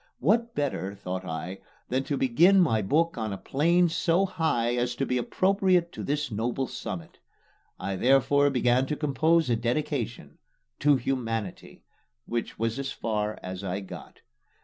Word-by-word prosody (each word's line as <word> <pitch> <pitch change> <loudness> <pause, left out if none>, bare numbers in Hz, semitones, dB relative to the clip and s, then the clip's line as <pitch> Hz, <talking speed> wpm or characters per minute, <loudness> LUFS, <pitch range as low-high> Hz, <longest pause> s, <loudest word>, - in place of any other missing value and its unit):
What 230 - +1
better, 115 -9 -2
thought 95 -1 -5
I, 90 +2 -5 0.3
than 130 +2 0
to 145 -3 -1
begin 170 +11 +5
my 115 -12 +3
book 155 +8 +1
on 110 -2 -2
a 100 - -4
plane 170 - +2
so 170 +3 +2
high 160 -11 0
as 120 0 -1
to 135 - -1
be 125 -1 0
appropriate 185 - +2
to - - -7
this 145 -1 -2
noble 120 +5 -1
summit? 95 -8 -7 0.6
I 100 - -3
therefore 135 +4 +4
began 125 0 +2
to 150 - -1
compose 160 +3 +2
a - - +4
dedication. 120 - -3 0.4
"To 145 0 +5
Humanity" 115 -6 -3 0.4
was 115 +1 -2
as 140 - -3
far 105 -2 -2
as 95 +1 -6
I 95 +1 -3
got. 95 - -11
130 Hz, 150 wpm, -27 LUFS, 110-155 Hz, 0.6 s, begin